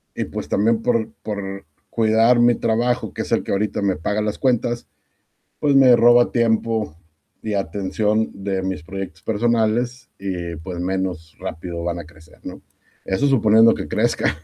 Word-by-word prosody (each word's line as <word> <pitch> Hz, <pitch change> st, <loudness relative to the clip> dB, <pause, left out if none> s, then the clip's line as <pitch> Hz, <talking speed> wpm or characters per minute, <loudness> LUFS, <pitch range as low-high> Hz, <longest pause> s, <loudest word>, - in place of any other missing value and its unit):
y -, -, -2 dB
pues, -, -, -6 dB
también 110 Hz, +2 st, +1 dB
por 115 Hz, -2 st, +1 dB
por 100 Hz, -2 st, -5 dB, 0.2 s
cuidar 115 Hz, +2 st, +3 dB
mi 120 Hz, 0 st, +5 dB
trabajo, 115 Hz, -1 st, 0 dB
que -, -, -3 dB
es -, -, -10 dB
el -, -, +2 dB
que -, -, -5 dB
ahorita 100 Hz, +1 st, -1 dB
me 100 Hz, -2 st, +1 dB
paga 105 Hz, +7 st, -2 dB
las 105 Hz, -1 st, -2 dB
cuentas, 120 Hz, -2 st, 0 dB, 0.7 s
pues, 145 Hz, -2 st, +2 dB
me 130 Hz, -3 st, +7 dB
roba 120 Hz, +1 st, +5 dB
tiempo, 115 Hz, -7 st, 0 dB, 0.5 s
y 110 Hz, -1 st, -3 dB
atención 100 Hz, +4 st, -1 dB
de 95 Hz, -1 st, -1 dB
mis 95 Hz, -5 st, -4 dB
proyectos 95 Hz, -3 st, -7 dB
personales, 120 Hz, +2 st, 0 dB
y 90 Hz, -3 st, -4 dB
pues, 85 Hz, +3 st, -7 dB
menos 90 Hz, -3 st, -3 dB
rápido 85 Hz, +1 st, -6 dB
van 85 Hz, 0 st, -2 dB
a 85 Hz, -, -7 dB
crecer, 80 Hz, -1 st, -19 dB
¿no?, -, -, -8 dB, 0.4 s
eso 95 Hz, +9 st, 0 dB
suponiendo 115 Hz, -4 st, +5 dB
que -, -, -6 dB
crezcan. -, -, +1 dB
105 Hz, 160 wpm, -21 LUFS, 95-115 Hz, 0.7 s, me